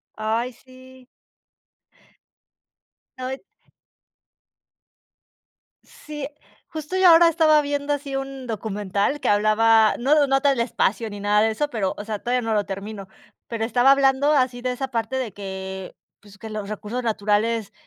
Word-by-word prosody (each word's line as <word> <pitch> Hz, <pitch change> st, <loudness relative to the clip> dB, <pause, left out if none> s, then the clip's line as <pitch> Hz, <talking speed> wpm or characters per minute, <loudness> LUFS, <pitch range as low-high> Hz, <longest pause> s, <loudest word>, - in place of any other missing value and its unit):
Ay, 225 Hz, +3 st, -1 dB
sí. 255 Hz, +1 st, -17 dB, 2.1 s
No, 255 Hz, 0 st, -4 dB
y 265 Hz, -, -4 dB, 2.5 s
Sí, 295 Hz, -2 st, -8 dB, 0.4 s
justo 315 Hz, +3 st, -6 dB
yo 375 Hz, 0 st, +5 dB
ahora 335 Hz, 0 st, +8 dB
estaba 315 Hz, -2 st, +4 dB
viendo 285 Hz, 0 st, -2 dB
así 280 Hz, -1 st, -4 dB
un 270 Hz, -1 st, -5 dB
documental 210 Hz, +2 st, -2 dB
que -, -, -1 dB
hablaba, 215 Hz, +1 st, +4 dB
no 285 Hz, +3 st, +3 dB
no 270 Hz, 0 st, +3 dB
tal 275 Hz, -3 st, +2 dB
espacio 230 Hz, -1 st, 0 dB
ni 205 Hz, -1 st, -8 dB
nada 205 Hz, +1 st, +2 dB
de 220 Hz, +1 st, +2 dB
eso, 290 Hz, +7 st, -2 dB
pero 210 Hz, -7 st, -2 dB
o 205 Hz, -, -7 dB
sea, 215 Hz, -1 st, -4 dB
todavía 245 Hz, +3 st, -1 dB
no 225 Hz, -, +1 dB
lo 205 Hz, -1 st, +1 dB
termino, 195 Hz, 0 st, -6 dB, 0.4 s
pero 225 Hz, -1 st, -2 dB
estaba 245 Hz, +3 st, +3 dB
hablando 275 Hz, +1 st, +3 dB
así 255 Hz, -4 st, +1 dB
de 255 Hz, 0 st, -1 dB
esa 265 Hz, +1 st, -4 dB
parte 235 Hz, +1 st, -2 dB
de 255 Hz, -6 st, -3 dB
que, 190 Hz, -1 st, -7 dB, 0.2 s
pues, 200 Hz, -1 st, -17 dB
que 220 Hz, -, -9 dB
los 210 Hz, -2 st, -5 dB
recursos 215 Hz, +3 st, -4 dB
naturales, 215 Hz, 0 st, 0 dB
235 Hz, 150 wpm, -23 LUFS, 210-270 Hz, 2.5 s, ahora